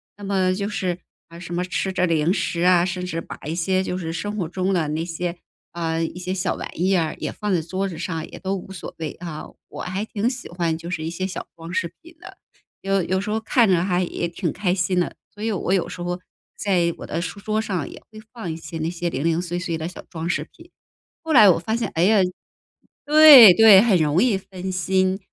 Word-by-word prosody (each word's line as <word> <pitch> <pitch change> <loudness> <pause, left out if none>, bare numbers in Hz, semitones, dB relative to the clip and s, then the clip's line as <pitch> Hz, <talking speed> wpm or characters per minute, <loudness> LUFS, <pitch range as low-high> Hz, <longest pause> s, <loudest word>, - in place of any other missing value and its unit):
那 205 - -13
么 190 -2 +1
就 200 +2 -3
是， 185 -3 -2 0.3
呃， 170 0 -12
什 175 0 -6
么 180 - 0
吃 190 +1 -2
着 180 -1 +1
零 165 0 +1
食 175 -3 -1
啊， 180 -1 +4
甚 180 0 -3
至 165 -2 -3
把 - - -8
一 160 - -2
些 185 +2 +1
就 180 - -3
是 165 -2 -4
生 205 +5 -4
活 175 -5 -2
中 185 +2 -2
的 160 -4 0
那 155 +2 -2
些， 170 +1 -4 0.4
啊， 165 -1 -2
一 165 +2 -3
些 180 0 -4
小 185 0 -1
玩 - - -6
意 190 +2 +2
啊， 165 -3 0
也 - - -4
放 210 -1 -4
在 180 - +2
桌 190 +3 -3
子 165 - -8
上， 165 -2 -4
也 - - -10
都 195 0 -3
无 190 0 -8
所 190 - -8
谓 160 -2 -4
啊。 165 -3 -7 0.2
我 - - -8
还 190 +4 -3
挺 220 +2 -1
喜 250 -1 -6
欢 170 -2 -2
就 170 +2 -8
是 160 -3 -3
一 160 - -3
些 185 +3 -3
小 190 - -6
装 165 +1 -9
饰 170 -2 -1
品 335 0 -16
的， 350 - -12 0.4
有 195 0 +1
有 190 +2 -1
时 205 +2 -4
候 220 - 0
看 225 +1 +3
着 180 -3 +3
还 180 -1 +1
也 170 0 -3
挺 170 -1 -3
开 185 -1 0
心 180 0 0
的， 175 - -2 0.2
所 210 +1 -9
以 225 - 0
我 185 -2 -2
有 185 - +1
时 175 - -8
候 175 +1 -3 0.4
在 175 -4 +1
我 - - -8
的 165 - -3
书 180 +4 -5
桌 215 +1 -1
上 185 -8 -3
也 - - -11
会 215 - -12
放 225 -9 -5
一 160 - -5
些 165 0 -8
那 160 +1 -1
些 175 0 -3
零 135 0 -3
零 165 0 +1
碎 175 0 -3
碎 170 -3 -3
的 160 - -4
小 180 - -9
装 165 0 -5
饰 155 -3 -1
品。 335 +1 -18 0.5
后 320 -1 -1
来 215 -7 +8
我 175 - +5
发 220 +7 -2
现， 235 - -2
哎 165 - +2
呀， 210 +2 +5 0.9
对 295 -9 +10
对， 215 0 +8
很 215 -2 +4
容 155 +4 +2
易 245 -5 +3
分 190 -1 -7
心。 185 +1 +1
180 Hz, 265 characters per minute, -22 LUFS, 170-195 Hz, 0.9 s, 对